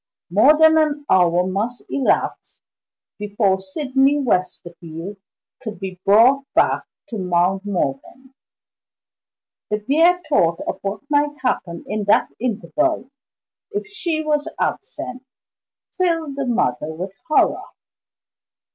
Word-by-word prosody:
More 265 - +5
than 315 0 +6
an 295 -2 0
hour 180 -1 +4
must 210 +6 -3
elapse 275 - -1 0.6
before 205 -2 +1
Sydney 270 +7 +1
Westerfield 180 - -3 0.4
could 220 -7 -7
be 190 -1 -7
brought 235 +7 +5
back - - +2 0.2
to 225 - -5
Mount 185 +2 +1
Morven; 200 - -4 1.4
the 210 - 0
bare 320 +11 +3
thought 170 - +2
of - - -3
what 200 +1 -4
might 290 0 +1
happen 170 -9 -2
in 215 -1 -2
that 205 - +3
interval, 255 - -1 0.6
if 415 -1 -4
she 345 -6 -2
was 305 +1 -1
absent, 260 - -4 0.7
filled 330 -6 0
the 275 -2 -3
mother 150 - 0
with 180 +4 -6 0.2
horror. 305 - +3
230 Hz, 110 wpm, -20 LUFS, 190-295 Hz, 1.4 s, than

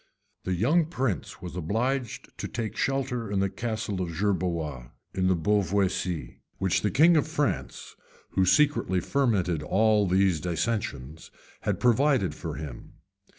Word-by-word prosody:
The 95 - 0
young 150 - +3
prince 125 - -3
was 90 -1 -6
obliged 115 - -2
to - - -3
take 110 -3 -4
shelter 125 -5 -1
in 100 - +1
the 95 0 0
castle 110 -4 -3
of 90 - -2
Gerberoy, 85 -10 -1 0.2
in 95 -1 +1
the 95 - +3
Beauvoisis, 95 -5 0 0.2
which 95 -2 +1
the 105 - +1
king 165 - +5
of 150 -1 +2
France, 150 -2 -2 0.4
who 95 - +2
secretly 140 -3 +3
fermented 95 - +1
all 105 +5 +3
these 95 -3 +2
dissensions, 80 - -3 0.3
had - - -2
provided 125 - +3
for 80 -3 -6
him. 70 -4 -8
100 Hz, 140 wpm, -27 LUFS, 90-120 Hz, 0.4 s, king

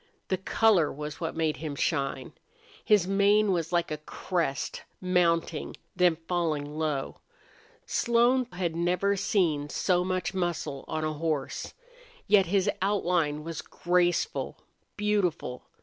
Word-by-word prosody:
The 190 - +1
color 190 -4 +3
was 150 +2 -7
what 165 - -3
made 160 -2 0
him 155 -2 -5
shine. 135 0 -1 0.5
His 205 -5 +4
mane 200 +1 +4
was 170 -2 -1
like 170 -2 +1
a 155 - -3
crest, 160 -2 -2 0.2
mounting, 170 -3 +1 0.2
then 180 -2 +4
falling 165 -5 0
low. 150 -4 -2 0.7
Slone 240 +1 +2
had 175 -2 -2
never 180 +4 +1
seen 160 -7 +1
so 180 +2 +1
much 185 0 -2
muscle 170 -6 -2
on 155 0 -2
a 155 0 -1
horse. 155 -3 -3 0.5
Yet 195 -4 +5
his 195 +2 +2
outline 175 -6 +1
was 165 -1 -5
graceful, 175 - 0 0.4
beautiful. 200 -11 -1
175 Hz, 125 wpm, -28 LUFS, 155-190 Hz, 0.7 s, Yet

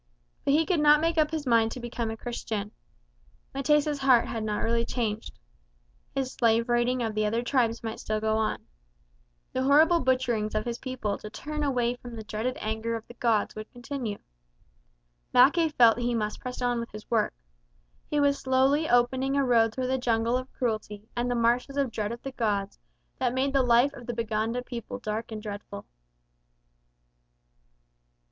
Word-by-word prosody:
But 280 - +2
he 320 +1 +3
could 360 -2 +1
not 295 0 +6
make 330 +1 +1
up 305 -1 +3
his 310 -2 -3
mind 230 -2 +3
to - - -7
become 235 -1 -3
a 225 - -5
Christian. 220 -3 -4 0.8
M'tesa's 295 +1 +2
heart 260 -3 +5
had 225 -2 -3
not 210 -1 -1
really 230 0 +1
changed. 225 -3 -3 0.8
His 265 -1 -1
slave 230 0 +2
raiding 240 +1 +2
of 220 -2 -3
other 215 +2 0
tribes 235 -3 +1
might 225 -1 -4
still 215 0 -2
go 220 0 0
on. 220 -1 -1 0.9
The 260 - 0
horrible 315 +5 +5
butcherings 245 -5 0
of 215 - 0
his 235 0 -3
people 255 -6 -3
to 210 - -8
turn 300 +7 -5
away 245 -4 0
the 230 -3 -8
dreaded 220 +4 -3
anger 220 +2 -2
of 225 -1 -7
the - - -11
gods 230 -3 +1
would 215 0 -8
continue. 245 -3 -5 1.2
Mackay 295 +7 +6
felt 235 -6 +5
he 240 0 0
must 215 -2 -2
press 250 0 -6
on 245 -1 +1
with 235 - -5
his 210 +2 -11
work. 220 -3 +1 0.7
He 295 - +1
was 285 -1 +3
slowly 265 +4 +2
opening 260 +3 +2
a 280 - +3
road 230 -3 +4
through 255 +3 -3
the 260 +1 0
jungle 230 -1 +1
of 255 +1 -3
cruelty 215 -3 -3
and 240 +1 -1
the 245 - 0
marshes 240 +4 +1
of 275 -4 +1
dread 210 -1 -2
of 235 - -7
the 270 - -5
gods 205 -5 -2 0.4
that 250 -1 0
made 270 +1 0
the 275 - +4
life 245 +3 +4
of 245 -4 -11
the 240 - -3
Baganda 225 +1 -1
people 245 0 -6
dark 220 -1 -4
and 215 -1 -6
dreadful. 205 - -7
240 Hz, 180 wpm, -27 LUFS, 225-260 Hz, 1.2 s, not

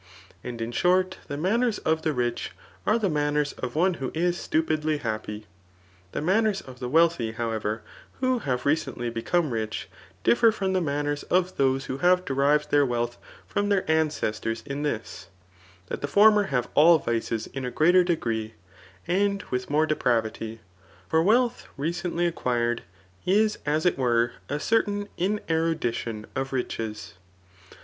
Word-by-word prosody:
And 120 -1 -6
in 115 - -4
short, 185 +7 +2
the 145 - -4
manners 220 +7 +1
of 160 0 0
the 160 - 0
rich 120 -3 -2 0.3
are 215 - +4
the 215 -4 0
manners 150 -2 0
of 125 +1 -6
one 180 +4 +3
who 130 - -1
is 175 +2 +1
stupidly 155 -2 0
happy. 110 -4 -4 0.7
The - - -3
manners 205 +3 +2
of 130 -2 -12
the 125 - -4
wealthy, 160 -7 +3
however, 110 -1 -2 0.4
who 255 -1 +1
have 125 - -2
recently 135 -5 0
become 150 +7 0
rich, 110 -3 -3 0.3
differ 235 -1 +5
from 195 -3 -2
the 185 - +2
manners 145 -1 -1
of 185 +1 +2
those 135 0 +2
who 130 - -4
have 180 +3 +3
derived 140 +2 +2
their 145 0 +5
wealth 120 -2 -1 0.3
from 205 0 -1
their 200 -2 +2
ancestors 115 -8 0
in 140 0 -4
this, 115 -9 -4 0.6
that - - -5
the 145 - -1
former 210 +5 +6
have 125 -6 -1
all 165 +3 +7
vices 115 -4 -2
in 135 0 -4
a 125 - -2
greater 175 +7 +4
degree, 115 - -2 0.5
and 200 +2 +1
with 125 0 -2
more 150 +2 +3
depravity; 115 -6 -1 0.5
for 160 - +3
wealth 240 +6 +2
recently 170 +3 -1
acquired 120 -8 0 0.5
is 210 +3 +3
as 155 +3 +1
it 180 - +2
were 120 -2 +2 0.2
a 145 +2 -1
certain 205 +2 +1
inerudition 160 - -1
of 135 0 -3
riches. 110 -5 -4
150 Hz, 155 wpm, -26 LUFS, 120-180 Hz, 0.7 s, all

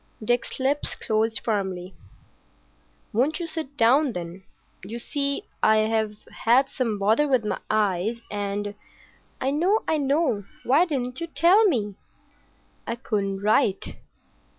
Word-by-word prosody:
Dick's 240 +3 0
lips 275 +3 +1
closed 220 0 0
firmly. 190 -4 -2 1.2
"Won't 270 - +1
you 345 - -3
sit 315 -4 -6
down, 260 +3 +4
then? 175 +2 -7 0.4
You 215 +5 -5
see, 280 +3 -2 0.2
I've 215 -1 +2 0.3
had 255 +4 +4
some 230 -5 -1
bother 220 +9 +3
with 255 -5 +2
my - - -2
eyes, 210 +1 +1
and——" 205 0 -3 0.7
"I 265 - 0
know. 365 +9 +2
I 315 -1 +1
know. 275 - +1 0.2
Why 285 +8 +4
didn't 260 -4 -3
you 335 - -2
tell 365 +7 +5
me?" 220 - +1 0.9
"I 230 - -1
couldn't 200 -5 -2
write." 205 -1 +1
235 Hz, 130 wpm, -25 LUFS, 205-280 Hz, 1.2 s, tell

